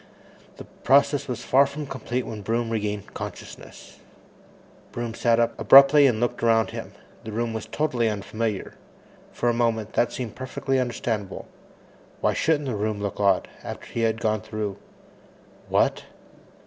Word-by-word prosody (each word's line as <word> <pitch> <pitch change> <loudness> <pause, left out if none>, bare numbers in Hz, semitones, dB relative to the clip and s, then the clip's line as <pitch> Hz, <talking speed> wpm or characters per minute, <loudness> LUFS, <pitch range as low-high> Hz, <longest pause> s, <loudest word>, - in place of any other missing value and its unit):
The - - -8
process 140 +1 +2
was 120 -2 -4
far 135 +3 +4
from 145 +2 -6
complete 130 -2 -4
when 110 -2 -6
Broom 115 +3 -1
regained 105 -2 -3
consciousness. - - -9 0.9
Broom 120 -1 -4
sat 115 0 +2
up 115 - +2
abruptly 140 +5 +8
and 115 -4 +1
looked 120 +1 -1
around 115 -1 +3
him. - - -7 0.3
The 110 - -7
room 115 +1 -2
was 110 - -5
totally 125 -7 0
unfamiliar. 105 0 -3 0.6
For 120 - -2
a 120 - +3
moment, 115 -2 0
that 120 - +2
seemed 120 -4 -5
perfectly 130 +1 -2
understandable. 115 -5 -3 0.7
Why - - +1
shouldn't 150 -3 +1
the 125 -4 -2
room 105 0 -2
look 100 0 -4
odd, 100 -2 +2 0.2
after - - -7
he - - -2
had 115 0 +1
gone 110 0 0
through 110 -2 -4 0.9
What? - - +1
115 Hz, 150 wpm, -24 LUFS, 110-130 Hz, 0.9 s, abruptly